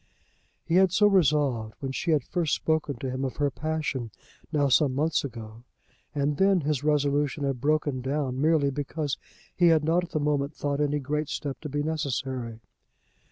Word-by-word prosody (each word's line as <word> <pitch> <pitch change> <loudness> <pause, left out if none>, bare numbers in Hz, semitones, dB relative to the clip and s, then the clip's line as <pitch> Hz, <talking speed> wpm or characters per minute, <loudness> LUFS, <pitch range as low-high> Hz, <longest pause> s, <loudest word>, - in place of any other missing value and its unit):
He 170 - +2
had 190 -1 +5
so 210 +3 +4
resolved 145 - +2
when 135 -1 -4
she 170 - -3
had 150 -5 +3
first 170 -1 0
spoken 155 -3 -1
to 130 +2 -4
him 130 +1 -3
of 130 - -3
her 145 -1 0
passion, 150 -6 -3 0.4
now 145 -3 +2
some 135 0 +3
months 155 +3 +1
ago; 115 -4 -8 0.5
and 145 0 0
then 195 0 +4
his 145 -2 -1
resolution 145 -1 +1
had 135 -3 -1
broken 145 -2 +1
down 135 -1 -2
merely 155 -2 +3
because 145 +1 -3 0.4
he 175 - +4
had 160 -2 +4
not 165 +3 +2
at 175 - -7
the 155 - -1
moment 145 0 0
thought 145 0 -1
any 145 0 +1
great 150 +1 -2
step 140 -2 -4
to 150 - -5
be 145 +1 -1
necessary. 130 -6 -3
145 Hz, 180 wpm, -27 LUFS, 135-155 Hz, 0.5 s, had